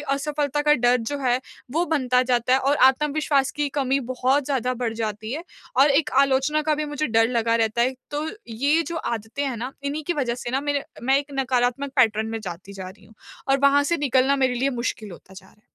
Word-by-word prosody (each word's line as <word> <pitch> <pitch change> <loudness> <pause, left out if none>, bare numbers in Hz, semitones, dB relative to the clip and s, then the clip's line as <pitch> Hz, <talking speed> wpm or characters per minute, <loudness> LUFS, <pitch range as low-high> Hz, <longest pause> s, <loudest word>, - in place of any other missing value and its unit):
असफलता 290 0 -1
का 295 - +4
डर 245 +1 +4
जो 250 +4 -4
है 255 -2 +1 0.3
वो 325 +6 +1
बनता 255 -5 +2
जाता 250 -1 +1
है 260 - +5
और 275 +2 +1
आत्मविश्वास 285 0 +1
की 295 -1 0
कमी 270 0 +1
बहुत 260 +3 +1
ज़्यादा 255 -2 -1
बढ़ 235 -2 -2
जाती 220 0 -4
है 315 +5 -4 0.3
और 275 +3 +6
एक 280 +1 +2
आलोचना 275 +3 +2
का 305 0 +1
भी 305 - -2
मुझे 295 0 -2
डर 225 0 +3
लगा 230 -2 +1
रहता 225 +1 +1
है। 255 +2 +1 0.2
तो 295 +1 -3 0.2
ये 280 +8 +1
जो 340 - -4
आदतें 235 -1 -4
हैं 265 -4 -2
ना 250 +4 -5
इन्हीं 285 +2 -3
की 350 - +1
वजह 255 -6 -1
से 245 0 -6
ना 265 +2 0
मेरे 285 -1 -1 0.2
मैं 265 +3 +3
एक 285 0 -7
नकारात्मक 255 +1 0
पैटर्न 220 -4 +3
में 225 - -4
जाती 190 0 -8
जा 190 -2 -7
रही 190 - -15
हूँ 220 - -20 0.3
और 270 - +3
वहाँ 280 +1 +5
से - - +3
निकलना 275 -1 +2
मेरे 260 -2 +1
लिए 265 +3 0
मुश्किल 235 -4 -4
होता 185 +2 -14
जा 190 0 -13
रहा - - -21
है। 210 - -31
260 Hz, 230 wpm, -23 LUFS, 235-285 Hz, 0.3 s, और